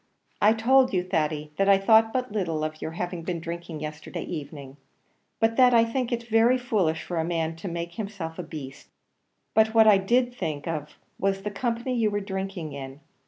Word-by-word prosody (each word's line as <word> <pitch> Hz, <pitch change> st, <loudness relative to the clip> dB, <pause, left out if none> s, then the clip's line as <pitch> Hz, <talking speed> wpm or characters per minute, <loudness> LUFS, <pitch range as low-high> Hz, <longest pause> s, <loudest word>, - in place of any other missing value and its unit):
"I 215 Hz, +2 st, +6 dB
told 255 Hz, +3 st, +4 dB
you, 180 Hz, -, +1 dB
Thady, 155 Hz, -4 st, -1 dB
that 195 Hz, 0 st, +2 dB
I 195 Hz, -, +7 dB
thought 220 Hz, +3 st, +5 dB
but 255 Hz, -2 st, -2 dB
little 170 Hz, -7 st, -1 dB
of 155 Hz, 0 st, -4 dB
your 160 Hz, -, -4 dB
having 175 Hz, 0 st, -4 dB
been 170 Hz, 0 st, -3 dB
drinking 170 Hz, -1 st, -6 dB
yesterday 150 Hz, 0 st, -6 dB
evening; 145 Hz, -4 st, -7 dB
not 135 Hz, -, -17 dB, 0.6 s
but 225 Hz, 0 st, +2 dB
that 250 Hz, -2 st, +6 dB
I 230 Hz, 0 st, +6 dB
think 245 Hz, +1 st, -2 dB
it 235 Hz, -1 st, -1 dB
very 230 Hz, +3 st, +4 dB
foolish 190 Hz, -10 st, 0 dB
for 175 Hz, -, -4 dB
a 160 Hz, -, +1 dB
man 165 Hz, -1 st, -1 dB
to 180 Hz, -, -7 dB
make 170 Hz, 0 st, -4 dB
himself 195 Hz, -7 st, -5 dB
a -, -, -3 dB
beast; 135 Hz, -4 st, -9 dB, 0.7 s
but 220 Hz, +1 st, +3 dB
what 220 Hz, -1 st, +7 dB
I 210 Hz, -2 st, +7 dB
did 245 Hz, +5 st, +1 dB
think 155 Hz, -10 st, -4 dB
of 150 Hz, -2 st, -5 dB, 0.2 s
was 195 Hz, 0 st, 0 dB
the 210 Hz, -, -3 dB
company 235 Hz, +3 st, -2 dB
you 225 Hz, -3 st, +2 dB
were 205 Hz, 0 st, -1 dB
drinking 190 Hz, -5 st, -5 dB
in. 135 Hz, 0 st, -8 dB
190 Hz, 205 wpm, -26 LUFS, 160-225 Hz, 0.7 s, I